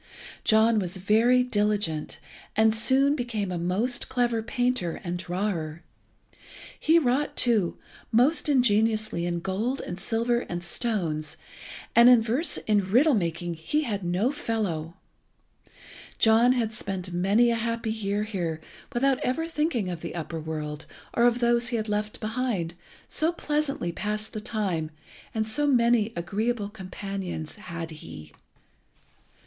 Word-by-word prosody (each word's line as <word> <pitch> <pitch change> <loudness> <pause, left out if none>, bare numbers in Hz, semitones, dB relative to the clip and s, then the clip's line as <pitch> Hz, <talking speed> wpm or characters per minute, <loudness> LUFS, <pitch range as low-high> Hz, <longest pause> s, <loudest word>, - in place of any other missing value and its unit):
John 220 0 +4
was 185 -1 -3
very 225 +6 +4
diligent, 205 -9 -1 0.4
and 220 0 +4
soon 265 +5 +3
became 225 -7 -3
a 175 - -2
most 205 +9 0
clever 240 -3 +1
painter 245 -6 -1
and 175 0 -3
drawer. 175 -3 -3 1.0
He 320 +2 +4
wrought, 275 -1 +1
too, 220 -8 +2 0.3
most 270 +8 +3
ingeniously 215 -7 +2
in 170 -1 -2
gold 215 +9 -1
and 175 +1 -6
silver 235 +4 0
and 175 -7 -5
stones, 170 - -2 0.6
and 235 +1 +8
in 250 -2 +8
verse 240 +9 0
and 205 -3 +2
riddle 265 +10 +4
making 175 -4 -1
he 165 - -1
had 205 -7 -3
no 180 +9 +1
fellow. 190 - -2 1.2
John 230 +3 +5
had 230 -3 -1
spent 190 -4 -4
many 200 +7 +3
a - - +1
happy 230 -1 -2
year 205 -1 -1
here 175 -7 -3 0.3
without 265 +1 +2
ever 320 +6 -1
thinking 300 - -1
of 170 -2 -6
the 170 - -6
upper 165 -1 -4
world, 155 -1 -5 0.3
or 235 - +3
of 240 -1 +4
those 235 0 +2
he 235 - -1
had 220 0 -3
left 210 0 -2
behind, 215 -7 -2 0.3
so 320 +2 +1
pleasantly 295 - -1
passed 210 +5 -3
the 215 - -4
time 190 -8 -2 0.5
so 290 +7 0
many 235 -4 +3
agreeable 205 +5 -1
companions 195 -4 -6
had 165 -5 -6
he. 80 - -10
215 Hz, 135 wpm, -26 LUFS, 180-240 Hz, 1.2 s, and